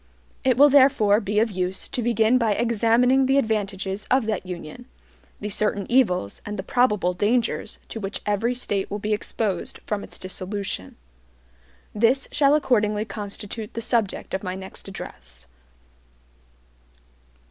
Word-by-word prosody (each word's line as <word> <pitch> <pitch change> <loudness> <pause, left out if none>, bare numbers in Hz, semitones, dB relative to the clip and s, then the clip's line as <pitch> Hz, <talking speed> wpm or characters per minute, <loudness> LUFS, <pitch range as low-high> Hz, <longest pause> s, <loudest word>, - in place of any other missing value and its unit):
It 255 -2 +3
will 290 +2 +8
therefore 260 -7 +5
be 210 -1 -3
of 225 0 +2
use 185 0 -2
to 255 - -2
begin 235 +1 +3
by 225 -3 +2
examining 235 +4 +3
the 270 +1 +3
advantages 205 -5 -1
of 260 -2 +3
that 210 -4 -2
Union, 170 -4 -8 0.5
the 210 - -4
certain 205 -1 0
evils, 185 - +2
and 210 0 -5
the 190 - -4
probable 210 -7 +2
dangers, 225 +6 0
to 225 - -5
which 195 -1 -4
every 220 +4 0
State 205 -5 -2
will 205 - -3
be 210 +1 -1
exposed 205 -3 -2
from 210 -1 -2
its - - -9
dissolution. 185 - -4 1.0
This 235 +5 +2
shall 285 0 +4
accordingly 215 -7 +1
constitute 210 0 -7
the - - -2
subject 225 -3 -1
of 190 - -1
my 185 -1 -4
next 190 +1 -8
address. 65 - -10
210 Hz, 145 wpm, -24 LUFS, 195-240 Hz, 1.0 s, will